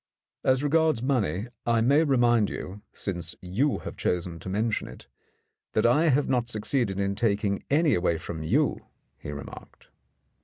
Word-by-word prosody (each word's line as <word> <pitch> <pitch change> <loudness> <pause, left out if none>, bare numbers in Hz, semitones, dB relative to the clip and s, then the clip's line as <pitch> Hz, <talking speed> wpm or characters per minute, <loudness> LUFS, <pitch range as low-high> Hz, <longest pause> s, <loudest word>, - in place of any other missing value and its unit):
"As 130 +1 +2
regards 155 -4 +2
money, 115 -7 0 0.2
I 115 -1 +2
may 140 +7 +4
remind 120 -7 +3
you, 100 +3 -7
since 85 -4 -5
you 110 +11 0
have - - -6
chosen 90 -1 -2
to 95 - -7
mention 110 +3 -1
it, - - -12 0.7
that 110 - +2
I 150 +8 +4
have 145 -1 +3
not 125 -2 0
succeeded 110 -2 -1
in 100 0 0
taking 100 -2 0
any 155 +2 +3
away 85 -2 +1
from 80 -1 -6
you," 80 - 0 0.3
he - - -8
remarked. 70 -1 -10
110 Hz, 155 wpm, -27 LUFS, 95-135 Hz, 0.7 s, may